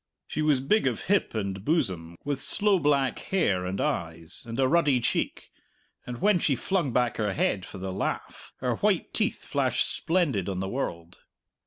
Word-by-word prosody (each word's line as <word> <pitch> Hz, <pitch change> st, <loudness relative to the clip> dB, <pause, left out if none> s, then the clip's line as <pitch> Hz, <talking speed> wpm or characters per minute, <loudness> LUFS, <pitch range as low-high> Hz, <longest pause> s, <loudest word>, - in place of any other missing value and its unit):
She -, -, -3 dB
was 150 Hz, -4 st, +3 dB
big 210 Hz, +6 st, +2 dB
of 120 Hz, -4 st, -1 dB
hip 200 Hz, -, +1 dB
and 100 Hz, -2 st, -3 dB
bosom, 90 Hz, -, 0 dB
with 145 Hz, -2 st, -1 dB
sloe 200 Hz, +3 st, +2 dB
black 140 Hz, -4 st, +2 dB
hair 95 Hz, -, 0 dB
and 95 Hz, +2 st, -3 dB
eyes, 80 Hz, -2 st, -2 dB
and 115 Hz, +2 st, -5 dB
a 130 Hz, -, +4 dB
ruddy 150 Hz, -3 st, +3 dB
cheek, 115 Hz, -, -1 dB, 0.6 s
and 120 Hz, -1 st, -5 dB
when 205 Hz, -3 st, +4 dB
she 145 Hz, -4 st, +2 dB
flung 170 Hz, +2 st, 0 dB
back 120 Hz, -1 st, +1 dB
her 105 Hz, -3 st, 0 dB
head 95 Hz, -1 st, 0 dB
for -, -, -9 dB
the 95 Hz, 0 st, -4 dB
laugh -, -, -4 dB
her -, -, 0 dB
white -, -, +1 dB
teeth -, -, 0 dB
flashed -, -, +1 dB
splendid 145 Hz, -, 0 dB
on 95 Hz, -2 st, -2 dB
the 95 Hz, -, -2 dB
world. 85 Hz, -7 st, -4 dB
125 Hz, 180 wpm, -27 LUFS, 95-155 Hz, 0.6 s, a